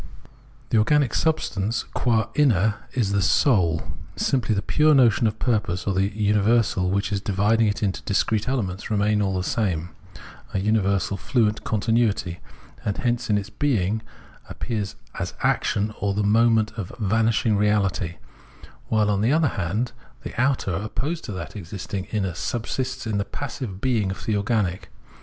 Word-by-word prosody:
The 110 - +4
organic 140 +4 +3
substance 115 -9 0
qua 115 -4 0
inner 110 -8 +3 0.2
is 110 -6 0
the 100 0 +2
Soul 90 - +3 0.3
simply, 115 -5 +1
the 100 - -1
pure 150 +6 +4
notion 120 -4 +4
of 110 0 -2
purpose 105 -8 0
or 100 - 0
the 95 +1 +2
universal 105 -2 +2
which 100 +3 0
in 100 - 0
dividing 105 +3 +2
into 105 +1 0
its 95 - -2
discrete 105 +1 0
elements 105 -8 -2
remains 105 0 +2
all 95 -2 0
the 90 - -1
same 90 -5 -1 0.7
a - - +2
universal 100 -1 +1
fluent 110 0 0
continuity, 110 -5 0 0.4
and 100 - -2
hence 120 -1 -1
in 105 - +3
its 105 +1 -4
being 110 -7 0 0.5
appears 105 -3 -4 0.2
as - - -4
action 105 +1 +1
or 100 -1 0
the 105 - +1
movement 110 +1 +3
of 90 - -5
vanishing 110 +1 +2
reality; 100 -4 +1 0.7
while, 110 -2 +2
on 100 -1 +1
the 115 +4 +3
other 155 -1 +3
hand, 105 +5 -2 0.3
the - - -6
outer, 130 -8 +1
opposed 125 - -3
to - - -5
that 90 -2 -6
existing 95 0 -5
inner, 95 -5 -2
subsists 120 +8 -3
in 110 -2 -1
the - - +1
passive 120 -5 -6
being 115 -5 +1
of 95 - -6
the 110 - +1
organic. 100 -4 -1
105 Hz, 155 wpm, -24 LUFS, 100-115 Hz, 0.7 s, The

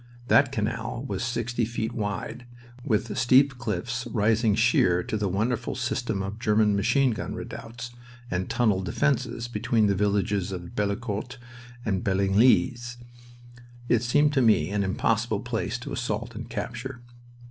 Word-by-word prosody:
That 135 -2 +5
canal 115 +1 -3
was - - -3
sixty 120 0 -1
feet 110 0 -2
wide, 105 +3 -4 0.4
with 110 -3 0
steep 130 +2 +4
cliffs 120 +1 -3
rising 110 -1 +2
sheer 90 -6 +3
to 105 +2 -3
a - - +2
wonderful 115 +6 -1
system 120 -5 -2
of 100 +3 -5
German 105 -2 +3
machine 130 +6 +3
gun 110 - -4
redoubts 120 +1 -7 0.4
and 90 +1 -2
tunneled 105 -6 +1
defenses, 125 -1 0
between 115 -2 +1
the 100 - +3
villages 100 -1 0
of 90 -2 -7
Bellicourt 105 +2 -2 0.5
and 95 -4 0
Bellinglis. 120 +5 +2 0.9
It 115 - +4
seemed 145 +5 +3
to 135 - +3
me 105 -8 +3
an 100 -1 0
impossible 110 +2 0
place 125 0 -2
to 120 - -8
assault 115 0 -3
and 115 +2 -7
capture. 120 +2 -5
115 Hz, 140 wpm, -26 LUFS, 105-120 Hz, 0.9 s, That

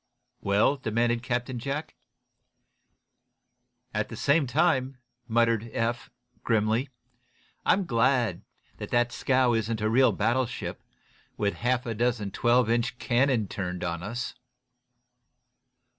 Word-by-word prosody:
"Well?" 105 +8 +2
demanded 115 -1 0
Captain 125 0 -2
Jack. 140 +5 -4 2.0
"At 105 0 -1
the - - -7
same 140 +5 +2
time," 135 -1 +1 0.3
muttered 115 -1 +2
Eph, 120 +1 -2 0.3
grimly, 110 +3 +1 0.8
"I'm 195 0 +3
glad 115 - +1 0.4
that 120 0 0
scow 130 -2 +2
isn't 115 0 -1
a 110 0 0
real 130 0 +5
battleship, 120 +5 -1 0.6
with 100 -1 0
a - - -14
half 125 +1 0
a 115 - -2
dozen 115 -3 -1
twelve 120 +1 +3
inch 120 +1 0
cannon 125 -3 +1
turned 90 -2 -4
on 85 -1 -3
us." 120 +6 -4
120 Hz, 115 wpm, -27 LUFS, 110-130 Hz, 2.0 s, real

